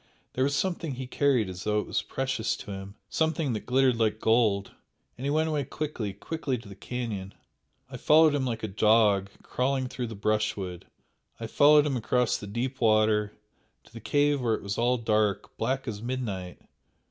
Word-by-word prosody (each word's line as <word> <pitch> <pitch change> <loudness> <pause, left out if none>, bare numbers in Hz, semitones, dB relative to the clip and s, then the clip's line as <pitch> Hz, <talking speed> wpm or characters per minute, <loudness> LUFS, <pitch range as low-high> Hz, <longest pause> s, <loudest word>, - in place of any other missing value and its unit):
"There 130 - 0
was 140 +1 +1
something 170 -3 -2
he 130 +1 -5
carried 125 -4 +1
as 90 0 -7
though 105 0 +1
it - - -3
was 105 - -1
precious 130 0 -2
to - - -9
him 95 +1 -7
something 160 -4 0
that 110 - -5
glittered 130 -1 +3
like 110 -1 +1
gold, 110 -4 +2 0.4
and 130 - -7
he - - 0
went 155 +2 +2
away 150 -2 0
quickly 135 -7 -4
quickly 135 +6 -3
to 115 -2 -12
the 100 - -9
canyon, 105 -3 -5 0.5
I - - -8
followed 155 0 +5
him 145 -2 0
like 120 -4 -3
a - - -1
dog, 105 -1 +3
crawling 130 +1 -1
through 125 -1 -4
the 110 - -7
brushwood 100 -4 -2 0.5
I 115 - -5
followed 145 +5 +5
him 140 -3 0
across 125 +1 +1
the 105 - -6
deep 125 +6 -4
water 110 -1 +3 0.5
to - - -22
the 115 - -8
cave 145 +5 +2
where 115 -3 +1
it - - -8
was 100 0 -3
all 125 +2 +2
dark 110 -3 0
black 135 0 -1
as 105 -3 -4
midnight!" 110 -8 -4
115 Hz, 190 wpm, -27 LUFS, 105-135 Hz, 0.5 s, followed